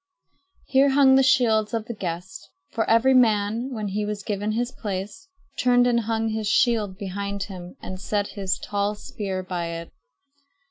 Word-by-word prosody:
Here 275 +1 +4
hung 270 -1 +5
the 265 - +6
shields 230 -5 +3
of 225 -1 -2
the 235 - -5
guests; 180 - -6 0.2
for 225 - -1
every 230 +4 +5
man, 225 0 +2
when 215 -4 -3
he 210 +2 -2
was 205 -1 -4
given 205 +1 -2
his 240 +2 -1
place, 205 - -6 0.3
turned 245 -1 +4
and 240 -1 +3
hung 225 0 -1
his 220 -1 -2
shield 215 -4 +2
behind 200 0 -4
him 180 -2 -9
and 185 0 -6
set 205 0 -1
his 195 -3 -2
tall 205 0 -2
spear 195 -2 -5
by 180 -2 -3
it. 170 0 -6
210 Hz, 170 wpm, -24 LUFS, 200-235 Hz, 0.3 s, the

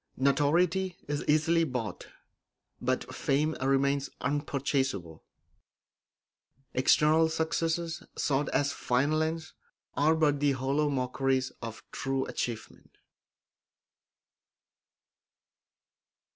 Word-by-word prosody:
Notoriety 170 +7 +2
is 145 0 -2
easily 160 +2 +3
bought, 125 -7 -4 0.7
but - - -1
fame 150 +3 0
remains 140 +1 +1
unpurchasable; 135 - -2 1.5
external 155 +5 +4
successes, 165 +1 -1 0.2
sought 145 -1 0
as 145 0 +1
final 145 +6 +1
ends, 160 0 -3 0.4
are 155 +3 +3
but 150 -3 +2
the 145 -1 +3
hollow 135 +3 0
mockeries 130 0 0
of 115 -1 -7
true 135 -1 -1
achievement. 115 -2 -6
145 Hz, 80 wpm, -29 LUFS, 135-160 Hz, 1.5 s, external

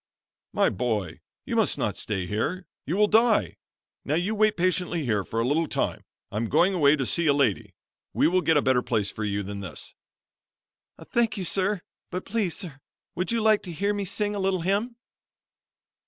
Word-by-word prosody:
"My - - +3
boy, 105 -3 -2 0.3
you - - -3
mast - - +2
not - - -1
stay 95 -4 -3
here; 145 - -2 0.2
you 170 +7 -1
will 210 - +5
die. 225 +1 +3 0.5
Now 145 - 0
you 180 +6 0
wait 215 0 +2
patiently 175 -2 0
here 105 -5 +1
for 115 - -4
a 115 - +1
little 160 +4 +1
time; - - -2 0.3
I'm 110 +2 -2
going 185 +3 +3
away 150 -5 +5
to 135 -3 -2
see 170 +5 0
a 145 - +5
lady. 130 -9 0 0.4
We - - +3
will 185 +2 +2
get 160 -3 +3
a 145 - +2
better 130 -1 +3
place 105 -5 -1
for 110 - -5
you 100 -1 -1
than 100 +1 -6
this." 95 -6 -9 1.2
"Thank 235 -2 +1
you 190 - -3
sir, 195 +1 +1 0.3
but 180 +1 -5
please, 210 -7 -1
sir, 155 -8 -6 0.3
would 180 +5 -2
you 230 -1 +1
like 215 -1 +4
to 180 - -7
hear 200 +5 0
me 200 -1 -2
sing 205 +2 -1
a 205 - -3
little 190 -2 0
hymn?" 205 +7 0
175 Hz, 195 wpm, -26 LUFS, 125-200 Hz, 1.2 s, will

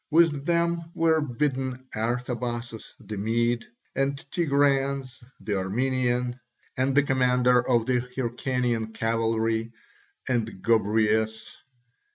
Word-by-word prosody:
With 155 -3 +3
them 170 0 +1
were 160 -1 +3
bidden 130 -1 -2
Artabazus 120 0 -3
the 105 - -7
Mede, 115 +3 0 0.3
and 135 +1 0
Tigranes 140 -4 +1 0.2
the 100 -3 -2
Armenian, 125 +4 0 0.4
and 130 +2 +1
the 145 - +6
commander 125 -2 +3
of 120 -3 +3
the 125 -1 +2 0.2
Hyrcanian 120 -2 -1
cavalry, 115 0 0 0.5
and 120 -4 +1 0.2
Gobryas. 110 0 +1
125 Hz, 100 wpm, -26 LUFS, 115-135 Hz, 0.5 s, the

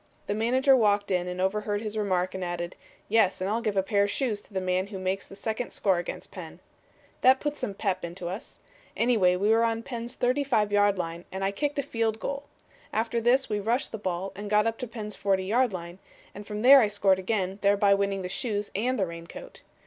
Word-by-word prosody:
The 205 - -1
manager 255 +5 +3
walked 205 -4 +2
in 180 -1 +1
and 180 0 -5
overheard 205 +2 0
his 215 0 -5
remark 185 -4 0
and 190 -1 -4
added, 175 0 -4 0.3
'Yes, 215 -3 +3
and 185 - -2
I'll 220 +3 0
give 215 -4 -1
a 190 - +3
pair 200 +1 +1
of - - -3
shoes 220 -4 -1
to - - -23
the 190 - -1
man 185 +1 0
who 200 -1 -7
makes 190 +1 -2
the - - -11
second 220 +3 -3
score 190 -4 +1
against 175 - -6
Penn.' - - -9 0.6
That 260 +1 +6
put 295 0 -2
some 200 -8 -4
'pep' 190 -3 -1
into 175 +1 -5
us. 190 +9 -7 0.4
Anyway, 220 -7 +3
we 200 +4 +2
were 225 +1 +4
on 230 0 0
Penn's 240 0 -5
35 245 -5 +1
yard 205 -1 +3
line 170 0 -4
and 190 +1 -4
I 195 - +1
kicked 290 +8 -2
a 280 - +1
field 225 -2 -1
goal. 280 +4 -4 0.5
After 230 +1 0
this 250 +3 +3
we 210 -1 -1
rushed 230 +6 0
the 220 - -5
ball 185 -1 -3
and 205 +1 -6
got 210 +1 +4
up 225 0 -1
to 250 - -4
Penn's 215 -3 -6
40 190 -1 0
yard 240 +4 +2
line, 175 0 -7 0.3
and 205 +1 -10
from 210 +1 -4
there 275 +2 +10
I 220 - +3
scored 200 -2 +2
again, 190 0 -2
thereby 200 0 +4
winning 200 -1 0
the - - -3
shoes 205 +1 -3
and 250 +6 0
the 190 - +2
raincoat. 170 - -10
205 Hz, 225 wpm, -27 LUFS, 190-230 Hz, 0.6 s, there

